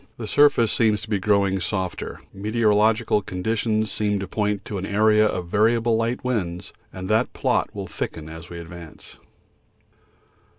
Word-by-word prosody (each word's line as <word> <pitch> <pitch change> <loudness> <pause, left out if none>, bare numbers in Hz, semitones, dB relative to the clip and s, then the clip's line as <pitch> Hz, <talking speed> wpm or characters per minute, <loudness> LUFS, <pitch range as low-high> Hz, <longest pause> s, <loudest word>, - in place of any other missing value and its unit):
The 115 - -5
surface 120 -2 +4
seems 110 -3 +2
to - - -8
be 100 - +1
growing 100 -1 +2
softer. 95 0 -3
The 95 - -13
meteorological 110 0 +2
conditions 110 +3 -1
seem 105 -1 0
to 95 -1 -4
point 105 0 -1
to 100 - -4
an 95 - -4
area 110 +1 +4
of 90 -4 -3
variable 115 +3 +2
light 115 +2 -1
winds, 95 -9 -3 0.2
and 95 0 -7
that 110 +4 +1
plot - - 0
will - - -4
thicken 80 -1 -5
as 80 +1 -10
we 85 - -8
advance. 85 -1 -11
105 Hz, 160 wpm, -23 LUFS, 95-110 Hz, 0.2 s, surface